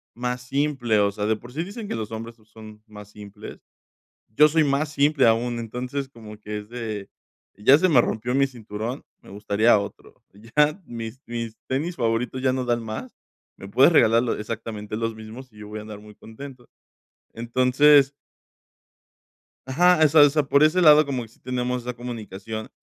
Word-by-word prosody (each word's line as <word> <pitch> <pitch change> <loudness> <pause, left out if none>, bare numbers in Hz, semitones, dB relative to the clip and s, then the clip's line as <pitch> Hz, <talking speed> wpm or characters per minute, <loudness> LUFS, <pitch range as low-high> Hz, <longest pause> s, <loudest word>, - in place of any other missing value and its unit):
más 125 +1 -3
simple, 135 -3 0
o 100 0 +2
sea, 105 +1 -3
de 110 - +2
por 120 +3 -13
sí 160 +4 -2
dicen 205 +4 -8
que - - -4
los 110 -2 -5
hombres 115 +1 -7
so 110 - -26
son 110 -1 -14
más 105 -1 -12
simples. 105 -1 -11 0.7
Yo 150 +8 +5
soy 155 +1 +2
más 145 +1 0
simple 145 -2 +3
aún, 120 +1 +1
entonces, 125 +4 -5
como 110 -4 -12
que 105 0 -6
es 105 0 -10
de: 110 -4 -6 0.5
"Ya 130 +8 +5
se 185 +3 +2
me 135 -8 +5
rompió 120 +3 -3
mi 135 0 +3
cinturón, 115 0 -6 0.2
me - - -16
gustaría 105 +2 +2
otro, 100 0 -9
ya 150 - 0
mis 115 +1 -8
mis 115 -1 -6
tenis 155 +7 -2
favoritos 120 +2 -1
ya 130 -1 +2
no 130 -1 -2
dan 120 -1 0
más, 110 +3 -7 0.4
me 95 - -9
puedes 130 +9 +5
regalar 115 -6 +4
lo 125 - -1
exactamente 110 -1 -6
los 115 0 -2
mismos 110 +4 -11
y - - -22
yo 105 - -9
voy 105 +1 -7
a - - -7
andar 105 -1 -10
muy 105 0 -15
contento". 125 +3 -12 0.6
Entonces 130 +4 +4 1.6
Ajá, 175 +6 +4
o - - +7
sea 150 +1 +5
o 145 - +7
sea, 150 +1 +1
por 140 +1 +3
ese 155 +4 +3
lado 155 -2 +7
como 130 -3 -3
que - - -11
sí 115 - -25
tenemos 125 0 -3
esa 125 +1 -4
comunicación 110 -3 -7
120 Hz, 190 wpm, -23 LUFS, 110-140 Hz, 1.6 s, o